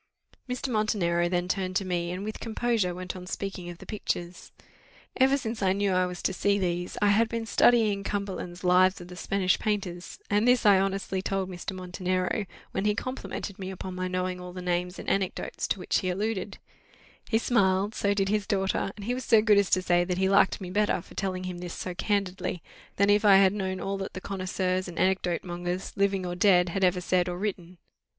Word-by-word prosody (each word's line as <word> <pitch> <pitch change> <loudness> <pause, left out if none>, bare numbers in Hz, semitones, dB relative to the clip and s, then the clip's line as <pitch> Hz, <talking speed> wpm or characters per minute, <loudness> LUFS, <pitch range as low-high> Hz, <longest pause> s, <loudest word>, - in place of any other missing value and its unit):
Mr. 250 +2 -3
Montenero 190 -7 +1
then 175 0 0
turned 185 -1 -2
to 195 - +1
me, 175 -2 -1
and 180 +2 -4
with 215 +1 -5
composure 225 -5 0
went 185 +1 -5
on 180 -1 -8
speaking 190 -2 -5
of 175 - -8
the - - -12
pictures. 180 -4 -4 0.6
Ever 265 +2 +4
since 230 -4 -4
I 190 -1 +3
knew 200 0 +1
I 185 0 +2
was 180 -1 -7
to - - +1
see 200 +2 +2
these, 175 -2 -2
I 205 - +5
had 220 +3 +3
been 230 -1 -3
studying 220 -3 +3
Cumberland's 190 -3 -4
Lives 185 +1 +4
of 175 0 -10
the 180 - -9
Spanish 185 0 +1
Painters, 190 -4 -3
and 210 +3 +2
this 250 -2 +4
I 200 -2 +7
honestly 195 -1 -1
told 190 -1 -2
Mr. 180 +2 -5
Montenero, 185 +2 -2 0.2
when 190 - -2
he 210 0 +2
complimented 225 -5 -5
me 190 -1 -5
upon 190 0 -6
my 185 0 -3
knowing 185 0 -2
all 180 0 -8
the 185 - -7
names 180 +1 -1
and - - -8
anecdotes 195 -2 -1
to - - 0
which 180 - 0
he 185 - -2
alluded: 200 +1 -2 0.7
he 225 - +3
smiled 200 -3 +2
so 200 -1 0
did 195 -1 +1
his 210 -1 0
daughter; 195 -1 0
and 205 - -8
he 245 - 0
was 255 +1 -4
so 225 -3 +5
good 210 -1 +5
as 200 - +1
to 185 - +2
say 175 -1 +3
that 180 0 -2
he 190 0 +2
liked 195 0 +4
me 180 -2 -6
better 210 0 +2
for - - -15
telling 185 -2 -3
him 180 -1 -5
this 175 -1 -6
so 180 - -4
candidly, 190 -3 -2 0.3
than 200 +1 +4
if 205 +1 +3
I 200 -2 +7
had 195 0 +6
known 190 -2 -2
all 195 0 -3
that 195 - -5
the - - -5
connoisseurs 185 -1 -2
and 170 -1 -9
anecdote 185 -2 +1
mongers, 175 +1 -4
living 195 -1 +1
or 175 - -3
dead, 180 -1 +4
had 195 +3 -2
ever 180 0 +3
said 180 0 +1
or 175 - -4
written. 185 -3 -4
190 Hz, 215 wpm, -27 LUFS, 180-205 Hz, 0.7 s, I